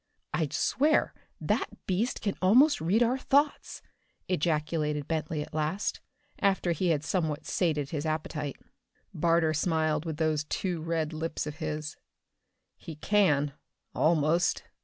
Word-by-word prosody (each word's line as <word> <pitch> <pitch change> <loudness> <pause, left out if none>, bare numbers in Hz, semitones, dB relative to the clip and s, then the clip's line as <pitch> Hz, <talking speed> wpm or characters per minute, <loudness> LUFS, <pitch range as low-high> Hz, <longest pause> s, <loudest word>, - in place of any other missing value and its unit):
"I'd - - 0
swear 300 +3 +2 0.3
that - - -2
beast 200 +7 -1
can 200 -2 -1
almost 250 - +5
read 195 +9 +3
our 250 +3 +1
thoughts!" 285 +2 +1 0.4
ejaculated 150 -3 0
Bentley 155 -1 -2
at - - -14
last, 155 +6 -1 0.4
after 195 -3 +2
he 175 +3 0
had 155 -3 +1
somewhat 160 -3 -1
sated 150 -6 0
his 150 -3 -2
appetite. 155 -2 -3 0.6
Barter 165 0 +2
smiled 155 -1 0
with 160 -2 -4
those 155 -1 +1
too 175 +1 -2
red 165 -1 -2
lips 160 0 -3
of 150 0 -6
his. 155 -1 -4 0.8
"He 165 - -9
can 150 -6 +2 0.4
almost. 160 +1 +2
160 Hz, 130 wpm, -29 LUFS, 150-185 Hz, 0.8 s, almost